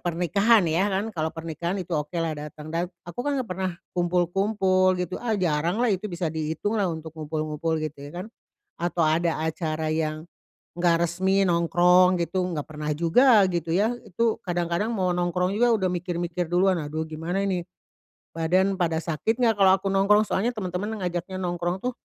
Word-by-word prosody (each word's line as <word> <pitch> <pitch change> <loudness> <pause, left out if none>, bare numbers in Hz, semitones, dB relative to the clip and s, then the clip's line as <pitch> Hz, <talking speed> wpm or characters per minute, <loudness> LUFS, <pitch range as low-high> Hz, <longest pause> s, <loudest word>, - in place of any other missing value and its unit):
pernikahan 190 +5 +3
ya 170 +5 +2
kan. 190 +2 0
Kalau 160 -2 -1
pernikahan 165 +3 -4
itu 175 0 -7
oke 150 +1 -2
lah 165 -1 -1
datang. 150 +1 -8
Dan 170 +1 0 0.2
aku 175 +8 -6
kan 290 -1 0
nggak 255 -4 -3
pernah 185 0 -2 0.3
kumpul-kumpul, 185 +2 +2
gitu. 180 0 -3
Ah, 225 -3 0
jarang 170 0 0
lah 245 - +3
itu 190 +1 -3
bisa 175 -2 -2
dihitung 160 +5 -2
lah 190 - +1
untuk 160 -1 -6
ngumpul-ngumpul, 155 +1 -2
gitu 150 -2 -6
ya 145 +6 -7
kan. - - -10 0.5
Atau 175 0 -1
ada 160 +1 +1
acara 160 -1 -2
yang 155 0 -2 0.6
enggak 170 -1 +3
resmi 190 +3 +1
nongkrong, 180 +2 +4
gitu. 180 +2 -1
Nggak 150 -4 -3
pernah 150 -1 -5
juga, 205 - +5
gitu 170 -2 -2
ya. 215 +6 +2
Itu 225 +4 0
kadang-kadang 175 +3 -1
mau 185 -3 +1
nongkrong 180 +1 0
juga 240 +1 +4
udah 190 -4 0
mikir-mikir 175 -1 -3
duluan, 185 0 +3
"Aduh, 155 +2 -3
gimana 165 +5 -3
ini? 185 -3 -1 0.7
Badan 185 +4 +1
pada 165 -3 +1
sakit 175 - -1
nggak 225 -3 +3
kalau 190 -1 +6
aku 195 - -3
nongkrong?" 205 +2 +4
Soalnya 235 +6 0
temen-temen 200 +2 -3
ngajaknya 180 +1 -3
nongkrong 175 +1 -2
tuh 250 - 0
175 Hz, 175 wpm, -25 LUFS, 165-190 Hz, 0.7 s, kalau